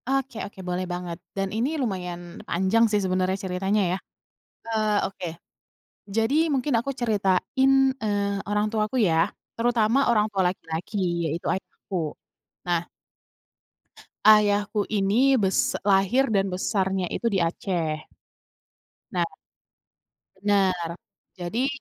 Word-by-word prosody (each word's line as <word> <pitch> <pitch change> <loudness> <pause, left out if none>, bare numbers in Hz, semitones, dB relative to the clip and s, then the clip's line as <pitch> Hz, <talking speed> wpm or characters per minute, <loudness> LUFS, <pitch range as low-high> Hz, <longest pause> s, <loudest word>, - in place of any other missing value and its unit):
Oke 270 -4 -1
oke 200 -1 -8
boleh 180 +1 -2
banget 175 -1 -4 0.2
dan 195 0 -1
ini 255 +9 0
lumayan 180 - -4
panjang 190 +6 +3
sih 210 - +2
sebenarnya 185 +1 +1
ceritanya 190 +3 0
ya. - - 0 0.7
Eee, 215 -1 +1
oke 190 -2 -7 0.8
jadi 225 +5 0 0.2
mungkin 270 +1 0
aku 240 +4 -2
ceritain, 225 +3 +1 0.3
eee, 200 -1 0
orang 210 +1 +1
tuaku 215 +2 -1
ya 165 -3 +4 0.3
terutama 230 0 +2
orang 215 -3 +3
tua 195 -2 +1
laki-laki 180 +3 -4 0.3
yaitu 160 +3 -3
ayahku. 180 -4 -4 0.5
Nah 175 -1 0 1.4
ayahku 210 -1 +4
ini 215 +6 +3
bes 190 -1 +2
lahir 200 +7 +3
dan 195 -3 +2
besarnya 190 -1 0
itu - - -4
di 200 -5 +2
Aceh. 165 -2 -1 1.1
Nah - - +1 1.2
Benar, 190 -4 +1 0.4
jadi 210 +9 -1
200 Hz, 115 wpm, -25 LUFS, 180-220 Hz, 1.4 s, ya